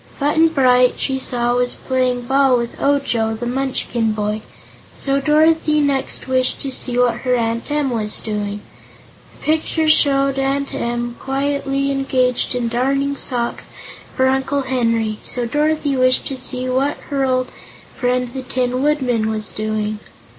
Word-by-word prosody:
Button 300 +3 +3
Bright, 255 -5 +3
she 265 -1 -1
saw, 240 -2 +1
was 245 0 0
playing 255 -1 -1
ball 265 0 +3
with 235 -1 -5
Ojo, 245 -6 +1
the 235 +2 -5
Munchkin 245 -3 -1
boy, 210 0 -2 0.6
so 275 0 0
Dorothy 305 +1 +3
next 280 -3 -1
wished 255 -1 +1
to 275 - -2
see 250 -1 0
what 245 -2 +2
her 250 0 0
Aunt 230 +1 -2
Em 290 -2 0
was 215 -3 +2
doing. 210 -1 -4 0.7
The - - -16
picture 315 +1 0
showed 275 -3 +4
Aunt 275 +1 -1
Em 240 0 -3
quietly 275 0 -1
engaged 260 -2 0
in 245 -1 -1
darning 275 +4 0
socks 240 -3 -2 0.5
for 260 - +3
Uncle 265 +1 0
Henry, 230 -4 0
so 245 -1 -2
Dorothy 295 +2 0
wished 255 0 +3
to 270 - -4
see 255 0 -3
what 265 +3 0
her 275 -1 0
old 255 -1 0 0.5
friend 250 -1 -1
the 265 - -4
Tin 255 0 -2
Woodman 255 -7 +1
was 215 -1 -3
doing. 215 0 -3
255 Hz, 150 wpm, -19 LUFS, 240-275 Hz, 0.7 s, showed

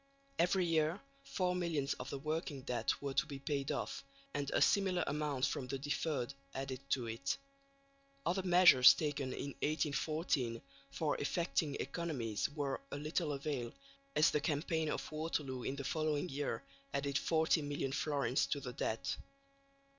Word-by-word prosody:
Every 180 +2 +3
year 160 +2 +2 0.2
four 185 -9 0
millions 165 -6 0
of 125 - -7
the 140 - -3
"working 150 -1 -3
debt" 120 -4 0
were 140 -1 -2
to 135 - +3
be 140 -2 -5
paid 140 0 -2
off, - - -3 0.3
and 140 -1 -1
a - - +2
similar 190 -3 +3
amount 145 -3 0
from 135 -2 -2
the 135 +2 -2
"deferred" 140 -1 -1 0.2
added 135 -1 -3
to 130 -4 +1
it. 115 +4 -2 0.9
Other 185 +3 +1
measures 175 -8 +8
taken 145 -3 -1
in 140 - -4
1814 150 -5 0 0.3
for 145 +2 -1
effecting 155 -1 0
economies 135 -8 -2
were 145 -2 -2
of 140 - -4
little 155 +1 -1
avail, 140 -4 -2 0.4
as 155 - +5
the 150 - +1
campaign 155 +2 0
of - - -3
Waterloo 155 -4 -2
in 130 - -2
the 140 - -5
following 155 +3 0
year 135 -5 -2 0.3
added 140 0 +1
40 160 0 +3
million 145 -2 -2
florins 140 -3 +1
to 145 - -1
the 125 -3 -6
debt. 90 -6 -1
145 Hz, 155 wpm, -36 LUFS, 135-160 Hz, 0.9 s, measures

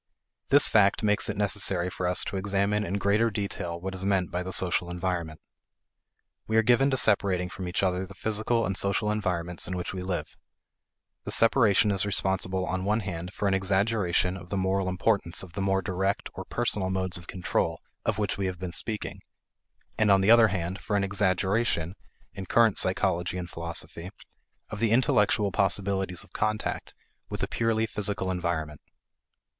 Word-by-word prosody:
This 145 +1 +6
fact 100 0 +3
makes 105 0 +1
it 105 - -3
necessary 95 -3 0
for 90 - -3
us 90 - +3
to - - -5
examine 100 +2 0
in 100 0 -3
greater 105 +3 +2
detail 100 -5 -4
what 95 +2 -5
is 95 0 -5
meant 95 -2 0
by 90 +1 -2
the 95 +1 -5
social 90 -1 +1
environment. 90 -3 -3 1.1
We 110 - +1
are 110 - +5
given 125 +4 +4
to 130 - 0
separating 95 -5 +3
from 90 0 -6
each 90 +2 -1
other 90 0 0
the 100 - -13
physical 110 +3 0
and 95 0 -2
social 100 +3 0
environments 90 -5 -2
in 90 +1 -3
which 90 - -4
we 95 - -5
live. 90 -1 -4 0.9
The - - -5
separation 110 -3 +4
is 95 -1 0
responsible 95 -2 0
on 95 +1 -2
one 105 +3 +1
hand 90 -3 -5
for 100 - -1
an 95 - +2
exaggeration 95 -1 +1
of 90 -1 -12
the 100 - -2
moral 95 0 0
importance 95 -2 0
of 90 -3 -12
the 95 - -4
more 95 0 +1
direct 100 +2 -1
or - - -7
personal 105 -6 0
modes 95 -2 0
of 85 - -15
control 90 -2 -1 0.2
of - - -1
which 100 -2 -2
we 95 - 0
have 90 -1 -4
been 90 -1 -6
speaking; 110 +3 -3 0.8
and 110 -1 +3
on 100 -1 +5
the 100 +3 +4
other 115 -1 +7
hand 95 -2 -3
for 105 - -2
an 100 - +2
exaggeration, 95 -2 0 0.4
in 95 -2 -7
current 115 -4 +4
psychology 90 +1 +1
and 90 -2 -6
philosophy, 85 +1 -6 0.6
of 110 - -5
the 115 0 +2
intellectual 105 -3 +2
possibilities 95 -1 0
of 100 - -22
contact 110 0 -2 0.3
with - - -4
a - - 0
purely 115 -1 0
physical 100 -3 -2
environment. 85 -4 -3
95 Hz, 180 wpm, -27 LUFS, 90-105 Hz, 1.1 s, other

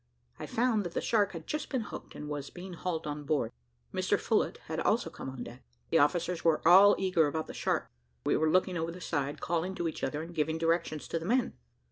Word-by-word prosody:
I - - -5
found 230 -3 +1
that 175 -2 -6
the - - +2
shark 210 -3 +2
had 165 -2 -7
just 300 0 -3
been 260 -3 0
hooked, 215 - -8
and 150 - -6
was 145 -2 -4
being 185 +1 -9
hauled 170 -1 -3
on 150 0 -4
board. 145 -6 0 0.4
Mr - - +2
Phillott - - +1
had - - -3
also - - +1
come - - -7
on 130 -2 -6
deck. 120 +2 -10 0.3
The - - +5
officers 170 +3 +1
were 160 -1 +3
all 195 +4 +9
eager 180 -5 +3
about 160 +2 -2
the - - -8
shark, - - -1 0.4
and - - +2
were 155 - +3
looking 185 +1 +2
over 165 +1 -2
the 175 - -9
side, 145 -5 -2
calling 175 +3 -1
to 170 - -1
each 160 - -5
other, 150 +1 -1
and 170 +1 -9
giving 160 0 0
directions 165 -2 0
to 165 - -1
the 165 - -7
men. 250 +3 +2
165 Hz, 230 wpm, -31 LUFS, 150-185 Hz, 0.4 s, all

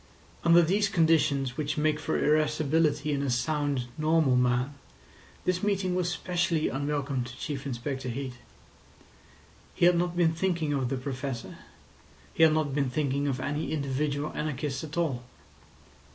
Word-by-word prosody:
Under 170 0 +6
these 200 +5 +2
conditions 155 - +2
which 150 0 -2
make 150 0 +1
for - - -1
irascibility 150 0 +2
in 140 - -1
a 140 - -1
sound, 145 +1 0
normal 155 -4 +3
man, 125 +2 +1 0.7
this 180 0 +1
meeting 195 -3 0
was 180 -1 0
specially 175 -2 0
unwelcome 140 -1 -2
to 120 +1 -9
Chief 140 -2 -4
Inspector 130 +1 -4
Heat. 130 +1 -4 1.4
He - - +3
had 175 0 +6
not 175 0 0
been 165 -2 +3
thinking 165 -3 0
of 135 -3 0
the 135 - -1
Professor; 130 -2 -5 0.7
he - - -2
had 160 -1 +7
not 155 -3 0
been 140 -2 +1
thinking 140 +1 0
of 135 -2 -1
any 145 +4 -2
individual 145 0 -1
anarchist 145 -2 -3
at 160 +1 -7
all. 140 -8 0
150 Hz, 150 wpm, -28 LUFS, 135-160 Hz, 1.4 s, had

